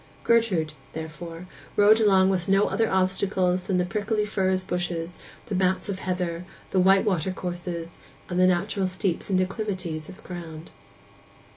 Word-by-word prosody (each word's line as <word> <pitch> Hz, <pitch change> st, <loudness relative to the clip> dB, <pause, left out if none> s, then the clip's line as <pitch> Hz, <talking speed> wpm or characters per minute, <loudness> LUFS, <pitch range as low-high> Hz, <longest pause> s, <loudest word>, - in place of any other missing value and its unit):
Gertrude, 205 Hz, -10 st, +2 dB, 0.2 s
therefore, 165 Hz, +2 st, -7 dB, 0.3 s
rode 210 Hz, +2 st, +6 dB
along 195 Hz, -3 st, +5 dB
with 180 Hz, -1 st, -1 dB
no 195 Hz, +1 st, +4 dB
other 225 Hz, -1 st, +1 dB
obstacles 185 Hz, -1 st, +1 dB
than 190 Hz, -, +1 dB
the 180 Hz, -, +2 dB
prickly 210 Hz, +2 st, -1 dB
furze 190 Hz, -2 st, 0 dB
bushes, 175 Hz, -2 st, -3 dB, 0.3 s
the 220 Hz, -, -5 dB
mats 185 Hz, +1 st, +1 dB
of 190 Hz, -1 st, -3 dB
heather, 180 Hz, -2 st, -2 dB, 0.3 s
the 190 Hz, -, +2 dB
white 195 Hz, +2 st, +5 dB
water 190 Hz, -3 st, +1 dB
courses, 175 Hz, -2 st, -5 dB, 0.3 s
and 180 Hz, 0 st, -2 dB
the 185 Hz, -, +6 dB
natural 185 Hz, +2 st, +1 dB
steeps 185 Hz, -1 st, -2 dB
and 190 Hz, -, +2 dB
declivities 185 Hz, -5 st, -2 dB
of -, -, -9 dB
the -, -, -18 dB
ground. 165 Hz, -3 st, -8 dB
185 Hz, 155 wpm, -26 LUFS, 175-195 Hz, 0.3 s, rode